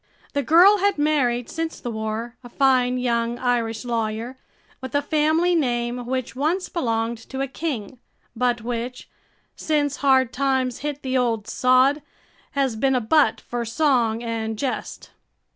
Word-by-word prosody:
The 285 - +1
girl 355 - +6
had 400 -1 +2
married 265 -6 +1
since 325 0 -4
the 240 - -5
war, 220 +2 -4
a 245 - -10
fine 255 -1 +2
young 235 -1 0
Irish 235 -2 -1
lawyer, 230 +1 -2 0.5
with 260 0 -6
a 285 - +3
family 315 +4 +2
name 240 -5 -1
which 255 -1 -3
once 320 +8 -1
belonged 230 -6 -1
to 265 - -5
a 275 - -1
king 260 -5 -5 0.4
but 240 0 0
which, 240 +2 -5 0.5
since 290 -2 0
hard 260 -3 +3
times 260 -2 0
hit 290 0 -5
the 260 -1 0
old 225 -4 -1
sod, 255 +5 +3 0.5
has 270 -4 0
been 265 +4 +1
a - - +3
butt 245 +1 +2
for 240 -1 -4
song 235 -2 +1
and 225 -1 -3
jest. 260 +2 -4
250 Hz, 150 wpm, -23 LUFS, 235-285 Hz, 0.5 s, girl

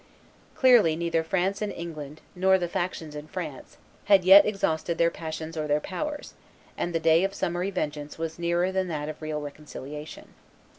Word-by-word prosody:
Clearly 240 - +5
neither 165 0 0
France 190 +4 -1
and 210 -1 -1
England 155 -3 -7
nor 190 +1 +4
the 175 -2 -2
factions 175 -3 -3
in 150 +1 -7
France 155 -6 -7 0.3
had 200 -2 +5
yet 195 +2 +9
exhausted 170 -5 -1
their 170 0 +3
passions 160 0 -6
or 155 -1 -2
their 150 0 +2
powers; 295 - -5 0.4
and 175 - -2
the - - +2
day 165 +2 +4
of 195 +1 -1
summary 180 0 -1
vengeance 150 -5 -4
was 165 0 -5
nearer 170 +2 +1
than 190 -1 -1
that 150 -3 -3
of 155 - -8
real 155 -1 -3
reconciliation. 150 0 -9
170 Hz, 170 wpm, -27 LUFS, 155-190 Hz, 0.4 s, yet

